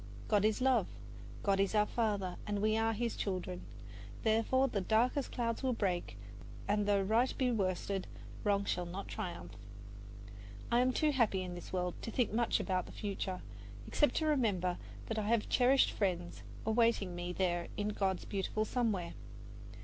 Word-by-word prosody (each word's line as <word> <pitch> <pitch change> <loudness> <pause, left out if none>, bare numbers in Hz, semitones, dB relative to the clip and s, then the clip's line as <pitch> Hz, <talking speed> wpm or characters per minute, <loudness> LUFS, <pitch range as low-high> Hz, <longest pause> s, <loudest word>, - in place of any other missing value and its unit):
God 205 -2 +3
is 215 +3 +2
love, 260 0 +3 0.6
God 195 -1 +2
is 195 +2 +2
our 210 0 +5
Father, 205 -6 -1 0.2
we 210 +1 +2
are 225 0 +2
His 230 +1 -1
children; 185 -2 -3 0.6
therefore 225 +4 +3
the 210 -6 -1
darkest 240 +7 +2
clouds 230 -2 -1
will 260 -2 +1
break 175 - -1 0.5
and 205 0 +1
though 200 -1 +3
right 225 +6 +3
be 255 -2 +2
worsted, 195 -2 -1 0.4
wrong 200 -1 +2
shall 180 -2 -1
not 185 +3 -6
triumph. 170 - -5 1.2
I 235 - +5
am 255 +1 +4
too 300 +4 +2
happy 220 -8 +2
in 180 -1 -5
this 175 - -8
world 180 -1 -1
to - - -4
think 230 -1 0
much 235 +1 +2
about 185 -2 -1
the - - -10
future, 195 -2 -3 0.5
except 295 - +2
to 315 - +1
remember 205 - +1 0.3
that 220 -1 -2
I 210 - -2
have 230 -1 +2
cherished 260 +2 +4
friends 180 -4 -2 0.2
awaiting 220 -4 +2
me 175 0 -3
there 175 -2 0
in 205 0 0
God's 195 -3 -1
beautiful 205 +2 -1
Somewhere. 215 -9 -1
205 Hz, 165 wpm, -34 LUFS, 185-230 Hz, 1.2 s, our